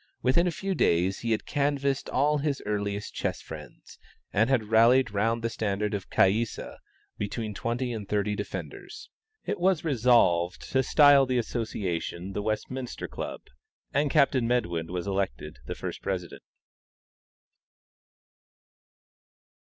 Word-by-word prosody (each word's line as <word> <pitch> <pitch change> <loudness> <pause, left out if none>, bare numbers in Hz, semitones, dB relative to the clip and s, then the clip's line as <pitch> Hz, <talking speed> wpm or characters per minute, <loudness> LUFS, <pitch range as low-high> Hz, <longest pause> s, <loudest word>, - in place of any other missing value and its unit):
Within 170 +8 +3
a - - +1
few 195 +4 -3
days 90 - +2
he 115 - -3
had 110 -1 0
canvassed 140 -1 0
all 145 +2 +2
his 140 -1 -1
earliest 105 -1 -2
chess - - -2
friends, - - -11 0.3
and 110 +4 +3
had 115 -6 +1
rallied 115 +2 +5
round 115 +3 0
the 115 - 0
standard 105 -1 -1
of 100 -2 -4
Caïssa 110 +4 +1 0.4
between 105 +1 -3
twenty 120 +4 -2
and 105 -3 -6
thirty 105 0 0
defenders. - - -7 0.3
It - - -2
was 185 -2 +2
resolved 115 - +3
to 130 - +3
style 140 0 +6
the 130 -1 +1
association 100 -6 -3
THE 105 - -2
WESTMINSTER 115 +4 -3
CLUB, - - -6 0.5
and 145 +1 +2
Captain 135 -5 +3
Medwin 85 -9 -1
was 90 -1 -3
elected 85 -8 -3
the - - -4
first - - -6
president. 90 -3 -4
115 Hz, 130 wpm, -27 LUFS, 100-130 Hz, 0.5 s, style